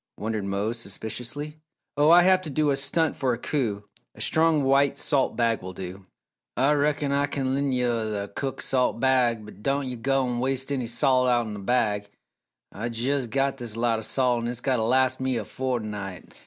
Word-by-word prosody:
wondered 110 -1 -3
Mose, 100 +4 -2
suspiciously. 120 +8 -5 0.4
"Oh, 145 +1 +4
I 175 +1 +8
have 185 0 +4
to 170 - -5
do 150 +1 +1
a - - +2
stunt 155 +3 +1
for 130 -3 0
a - - -3
coup 110 -7 -2 0.3
a - - -15
strong 160 -2 +2
white 135 +1 +3
salt 140 -3 +1
bag 115 -2 +1
will 95 0 -7
do." 95 +1 -8 0.5
"Ah 135 +4 +3
reckon 145 -1 +1
Ah 140 0 +2
kin 135 -2 -2
len' 140 0 0
yo' 115 -5 -1
th' 100 - -16
cook 135 +3 -4
salt 125 -3 0
bag 125 -4 +2
but 105 -1 -13
don' 140 +2 0
yo' 125 -1 -5
go 135 +3 +1
an' 120 -1 -2
waste 135 +2 -1
enny 130 -4 -1
salt 125 +2 +2
outen 120 -3 +1
the 105 - -6
bag. 105 -1 0 0.6
Ah 110 - -6
jes' 125 +3 -1
got 135 +3 0
this 115 -4 -6
lot 115 -1 +1
o' - - -6
salt 125 +1 +1
an' - - -2
its 120 -1 -4
gotta 125 -2 0
las' 130 +3 +2
me 130 -1 0
a 110 - -2
fo'tnight!" 105 -8 -4
125 Hz, 200 wpm, -25 LUFS, 110-140 Hz, 0.6 s, I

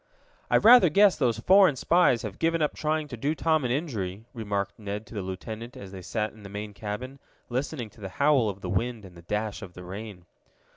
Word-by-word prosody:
"I - - +5
rather 230 -6 +8
guess 200 +4 +5
those 120 -6 +1
foreign 185 +4 +5
spies 135 -4 +3
have 105 -3 -6
given 165 0 +1
up 150 - 0
trying 155 0 -1
to 125 - -5
do 140 +7 -1
Tom 160 -2 +1
an 125 - -1
injury," 110 - -3
remarked 105 -4 -3
Ned 105 +1 -5
to - - -14
the 105 - -3
lieutenant 110 +7 -7
as 100 -6 -9
they 95 -1 -8
sat 105 +4 -3
in 110 - -16
the 100 - -10
main 105 +1 -6
cabin, 115 +7 -6 0.3
listening 125 -2 -3
to 110 - -18
the 95 - -5
howl 140 -1 +3
of 100 0 -7
the - - -5
wind, 115 +2 -2
and 90 -2 -13
the 85 - -12
dash 105 +4 -3
of 90 - -9
the 90 - -9
rain. 95 -1 -8
110 Hz, 225 wpm, -27 LUFS, 100-145 Hz, 0.3 s, rather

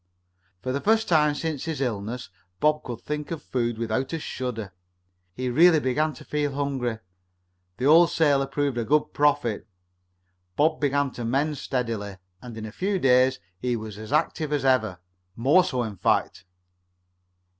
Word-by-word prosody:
For 130 - -2
the 140 +2 -2
first 220 +1 +2
time 150 -3 +3
since 155 -2 -3
his 160 -4 -3
illness 120 -2 -3 0.3
Bob 150 +4 +2
could 120 -2 -7
think 150 0 -4
of 165 -3 -5
food 120 -3 -2
without 115 +5 -2
a 165 - -1
shudder. 115 -9 -5 0.6
He 130 0 -3
really 160 +6 +5
began 150 +4 0
to - - -13
feel 145 -2 -1
hungry. 135 -5 -2 0.8
The 125 - -2
old 165 +4 +7
sailor 140 -4 +2
proved 140 -3 -1
a - - 0
good 150 +5 +1
prophet. 140 -7 +1 0.9
Bob 155 +1 +2
began 145 -1 +1
to 120 - -7
mend 140 +5 0
steadily, 115 -6 -3 0.2
and 120 -2 -9
in 110 - -5
a 110 - -7
few 195 - -1
days 130 -4 +3 0.2
he 125 +3 -1
was 110 -2 -7
as 110 +3 -8
active 155 0 0
as 145 -3 0
ever 110 -8 +2 0.4
more 140 +10 +4
so, 125 -6 -1
in 105 -4 -6
fact. 90 - 0
135 Hz, 165 wpm, -25 LUFS, 120-150 Hz, 0.9 s, old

